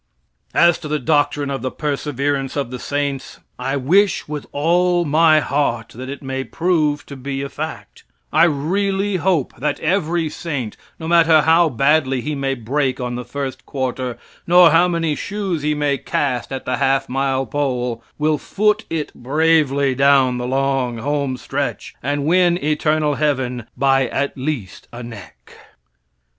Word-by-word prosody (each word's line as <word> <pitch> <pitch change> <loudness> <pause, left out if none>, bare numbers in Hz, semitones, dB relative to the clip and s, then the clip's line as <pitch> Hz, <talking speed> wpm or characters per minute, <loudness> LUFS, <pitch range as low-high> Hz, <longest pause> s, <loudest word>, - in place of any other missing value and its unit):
As 170 -1 +5
to 155 - -7
the 150 0 0
doctrine 145 0 +1
of 135 - -3
the 130 - -2
perseverance 140 -1 -2
of 140 -4 -2
the 125 - -5
saints, 140 -1 -3 0.2
I 135 +2 -1
wish 185 +9 +2
with 150 -1 -5
all 175 +3 +2
my 155 +1 +4
heart 135 -6 -1
that 130 +3 -8
it 140 0 -7
may 135 0 -3
prove 155 -3 0
to 140 - -9
be 135 +1 -4
a 140 - -5
fact, 155 +3 -7 0.3
I - - +6
really 195 +6 0
hope 170 -5 0
that 145 +3 -2
every 165 -1 0
saint, 145 -8 -4 0.2
no 160 - -5
matter 165 -2 +5
how 165 +1 +4
badly 135 +1 +2
he 150 +5 -3
may 135 -1 -1
break 130 +2 -1
on 125 -1 -3
the 125 0 -4
first 135 +2 -6
quarter, 130 -2 -3 0.3
nor 175 -1 +7
how 170 +3 +5
many 165 -3 0
shoes 195 -5 -3
he 150 +1 0
may 145 -2 0
cast 130 -4 -2
at 135 - -5
the 125 -1 -1
half 135 0 +1
mile 135 0 0
pole, 125 -3 -2
will 150 0 +1
foot 210 +5 +1
it 160 -2 -3
bravely 140 0 +2
down 135 -2 +3
the 125 - -3
long 135 -2 0
home 140 +1 -1
stretch, 135 +4 -4
and 145 +1 -1
win 175 +1 +3
eternal 155 0 +1
heaven 130 -5 -1
by 135 -1 +3
at 140 +3 -2
least 130 -8 -5
a 120 +1 -8
neck. 105 -9 -12
145 Hz, 160 wpm, -20 LUFS, 130-160 Hz, 0.3 s, nor